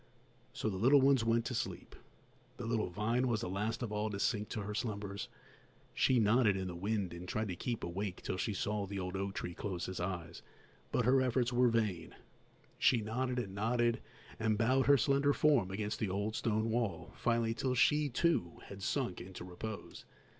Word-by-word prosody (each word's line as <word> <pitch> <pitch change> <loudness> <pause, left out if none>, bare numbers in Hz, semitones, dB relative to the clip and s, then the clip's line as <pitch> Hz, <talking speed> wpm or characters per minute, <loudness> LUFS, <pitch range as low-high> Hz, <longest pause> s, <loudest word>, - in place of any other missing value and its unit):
So - - -3
the 100 -3 -1
little 135 +7 +6
ones 135 -2 +4
went 115 +1 +2
to 125 - -3
sleep. - - -4 0.6
The 120 - -5
little 115 -4 0
vine 115 +7 0
was 115 -3 0
the - - -3
last 105 +6 -2
of 115 - -3
all 105 +1 -1
to 100 -2 -4
sink 105 -1 0
to 110 - -3
her 105 +1 -4
slumbers; 105 -4 -3 0.7
she 130 -2 +3
nodded 105 -2 +4
in 95 -1 -3
the - - -5
wind 100 -1 -1
and 85 +1 -8
tried 110 +2 -2
to 90 - -3
keep 120 +5 -3
awake 95 +2 -4
till 95 - -2
she 105 +1 -1
saw 105 +1 -1
the 100 +1 -5
old 90 0 -3
oak 95 0 -3
tree 90 - -4
close 90 -2 -4
his 95 - -5
eyes, 85 -2 -4 0.5
but 125 - +1
her 130 +2 +5
efforts 125 -1 +1
were 125 +1 +5
vain; 110 -6 -1 0.6
she 125 - +4
nodded 125 +4 -2
and 105 -6 -3
nodded, 115 +3 +1 0.4
and 110 -1 +1
bowed 130 +4 +3
her 140 0 +7
slender 140 +2 +3
form 140 -12 +3
against 105 +2 -3
the 105 - -1
old 100 +3 -2
stone 110 0 0
wall, 115 -3 -1
till - - -19
finally 115 -1 +1 0.2
she, 150 +4 +4
too, 125 - +1
had 100 -1 -9
sunk 120 -3 -1
into 90 0 -8
repose. 95 +4 -7
110 Hz, 195 wpm, -34 LUFS, 95-120 Hz, 0.7 s, her